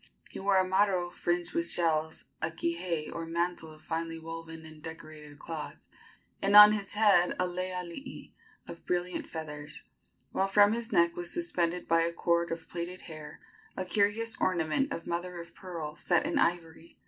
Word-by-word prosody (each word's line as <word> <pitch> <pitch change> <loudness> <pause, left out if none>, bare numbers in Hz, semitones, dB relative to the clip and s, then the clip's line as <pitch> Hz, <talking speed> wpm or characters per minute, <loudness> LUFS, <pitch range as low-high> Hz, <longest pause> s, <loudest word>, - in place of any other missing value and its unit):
He - - -7
wore 195 0 +3
a 185 0 +3
maro 190 -2 +2
fringed 175 0 -1
with 170 0 0
shells, 160 -2 0 0.2
a 160 - 0
kihei 170 -1 -2
or 165 0 -5
mantle 170 -1 -2
of 155 0 -16
finely 165 0 -3
woven 165 0 -8
and 155 -1 -12
decorated 155 -2 -10
cloth, 160 0 -7 0.6
and 200 +1 +3
on 210 0 +12
his 205 -2 -3
head 205 -4 +4
a 180 - +2
lei 180 +1 -3
alii 180 +9 -7 0.3
of 170 - -9
brilliant 180 0 -1
feathers, 150 -2 -7 0.5
while 195 - +1
from 205 +1 +5
his 235 0 -4
neck 170 0 +3
was 175 0 -4
suspended 180 - -1
by 165 0 +4
a 170 0 +1
cord 170 0 +1
of 165 0 -5
plaited 175 +1 -5
hair 155 -2 -10 0.4
a 185 - -2
curious 210 +4 +1
ornament 185 - +1
of 165 - -4
mother 175 +1 -3
of 170 - -10
pearl 165 -5 -6
set - - +1
in 310 -1 0
ivory. 170 - -1
170 Hz, 170 wpm, -30 LUFS, 165-185 Hz, 0.6 s, on